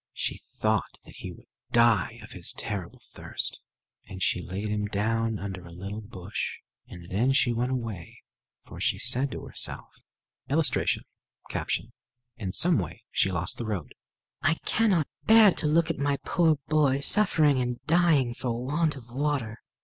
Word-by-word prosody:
She - - -3 0.2
thought - - 0
that - - -13
he - - -7
would - - -15 0.3
die 115 -1 +3
of 105 - -12
his 90 -3 +1
terrible 100 -6 -5
thirst; - - -2 0.5
and - - -8
she - - +1
laid 95 +4 -4
him 105 0 -1
down 110 +2 0
under 95 -2 -6
a 85 - -12
little 100 +5 -6
bush; 100 -3 -5 0.3
and 85 -1 -11
then 120 +8 +2
she 130 -3 +3
went 120 +2 -1
away, 115 -9 -5 0.4
for - - -11
she - - +1
said 135 +3 0
to - - -7
herself: - - -2 0.6
[Illustration: 155 +2 +2 1.3
In 100 -6 -4
some 170 - +3
way 90 -5 -6
she 95 - +2
lost 85 0 -1
the 120 - -3
road] 90 -10 -4 0.5
"I 155 +4 +3
cannot 195 -9 +2 0.2
bear 220 -2 +8
to 155 - 0
look 165 +2 +3
at 150 - -6
my 140 0 +1
poor 165 -4 +3
boy 145 -3 +3
suffering 155 -6 +5
and 125 -1 -2
dying 155 -7 +3
for 120 0 -3
want 150 +2 +1
of 125 -4 -11
water." 125 -3 -2
120 Hz, 160 wpm, -27 LUFS, 105-150 Hz, 1.3 s, bear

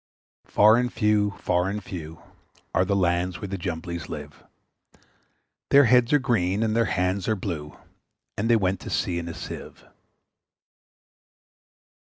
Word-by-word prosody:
Far 110 +2 +5
and 125 0 0
few, 105 -2 +1
far 90 +1 0
and 105 0 -4
few, 80 -4 -8 0.5
Are 90 - +3
the 100 +2 0
lands 90 -1 0
where 100 - -6
the 100 - -3
Jumblies 85 -1 -5
live; - - -8 1.3
Their 140 +1 +7
heads 125 -1 +4
are 150 - +6
green, 110 -7 0
and 110 -1 0
their 115 0 +3
hands 90 -1 -1
are 110 - +2
blue, 80 -7 -5 0.6
And 110 +3 -1
they 120 - +6
went 95 -3 +1
to - - -8
sea 85 -1 -1
in 85 - -6
a 85 - -7
Sieve. - - -9
95 Hz, 150 wpm, -25 LUFS, 90-110 Hz, 1.3 s, Their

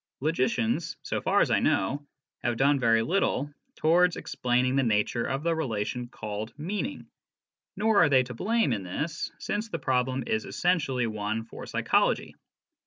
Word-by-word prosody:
Logicians, 140 0 0
so - - -2
far - - +3
as - - +2
I - - +4
know, 145 +9 0 0.3
have 120 -1 -1
done 140 +2 +3
very 115 -2 +3
little 145 -3 0 0.2
towards 175 +3 +3
explaining 125 +1 0
the 135 - +4
nature 115 0 +1
of 135 +4 -2
the 170 0 +2
relation 120 -4 -2
called 110 -1 -6
" - - -38
meaning," 205 - -4 0.7
nor 215 -1 +3
are - - +5
they 130 -2 +5
to 125 0 -8
blame 215 - +1
in 105 - -2
this, 150 - -4
since 215 +2 -3
the - - -3
problem 130 0 0
is 110 0 -1
essentially 135 -9 0
one 110 0 -2
for 115 - -10
psychology. - - +1
130 Hz, 165 wpm, -28 LUFS, 115-160 Hz, 0.7 s, are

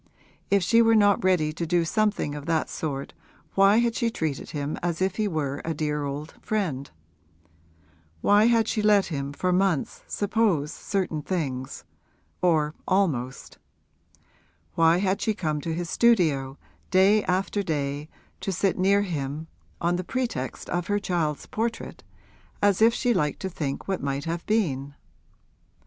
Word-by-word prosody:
If 200 -2 +3
she 230 +6 +5
were 225 0 +5
not 205 -3 +4
ready 170 -5 +2
to 170 +1 -4
do 170 0 +2
something 210 -5 0
of 145 +1 -7
that 165 -1 0
sort 140 -3 -4 0.4
why 195 +2 +5
had 235 0 +2
she 235 0 0
treated 155 -10 -3
him 145 0 -3
as 170 -1 -2
if 190 0 0
he 215 -1 +1
were 145 -6 -2
a 165 -1 -3
dear 150 -1 -1
old 145 +3 -5
friend; 160 -11 -2 1.3
why 205 +1 +5
had 230 -2 +3
she 215 - 0
let 210 -2 +4
him 140 -1 -3
for 180 +5 -1
months 185 -6 0
suppose 200 -8 0
certain 185 -6 -2
things 135 -7 -3 0.6
or 155 -4 +2
almost; 145 -10 -1 1.1
why 165 +1 +4
had 190 +1 0
she 220 - 0
come 155 -6 -2
to 165 - -3
his 170 0 -4
studio 155 - +2 0.3
day 195 +3 +4
after 195 +3 0
day 145 -3 -3 0.3
to 195 - -3
sit 190 +1 0
near 200 +2 +4
him 150 -4 -4 0.3
on 175 +1 +1
the 180 - -3
pretext 230 - -3
of 175 -1 -1
her 205 - +1
child's 170 -7 -1
portrait, 230 +1 -4 0.6
as 205 0 +2
if 225 +1 +7
she 245 +1 +1
liked 150 -8 0
to 190 - -2
think 145 -6 -4
what 190 -1 -1
might 140 0 -2
have 170 +1 -3
been? 145 -11 0
175 Hz, 155 wpm, -26 LUFS, 150-200 Hz, 1.3 s, if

